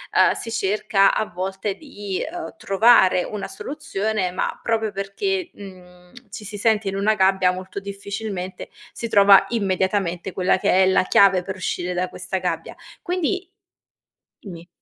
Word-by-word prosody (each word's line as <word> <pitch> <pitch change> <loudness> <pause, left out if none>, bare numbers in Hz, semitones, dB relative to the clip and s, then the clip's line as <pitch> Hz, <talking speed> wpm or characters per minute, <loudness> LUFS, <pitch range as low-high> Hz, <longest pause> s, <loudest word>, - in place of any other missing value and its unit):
uhm, - - +5
si 230 - -6
cerca 205 -1 +2
a - - 0
volte 190 +2 -4
di, 205 - -6
uhm, 350 0 -7
trovare 195 - +4
una 210 -2 -5
soluzione, 220 -9 -3
ma 185 - -3
proprio 220 -2 -1
perché, 345 - -3
mhmm, 180 -2 -14 0.2
ci 205 +2 -9
si 205 +1 -7
sente 215 0 +1
in 195 - -2
una 205 +2 +2
gabbia, 190 -2 +3
molto 185 +1 -7
difficilmente, 200 -1 -6 0.2
si 230 - -5
trova 200 -2 +7
immediatamente 190 -4 -1
quella 185 0 +2
che 190 0 +3
è - - +5
la 190 - +3
chiave 195 -1 +5
per 190 +1 -5
uscire 180 -1 -3
da 180 +1 -1
questa 185 +1 -4
gabbia. - - -4 0.3
Quindi 365 +1 -2 0.9
dimmi. 175 -4 -11
195 Hz, 150 wpm, -22 LUFS, 185-215 Hz, 0.9 s, trova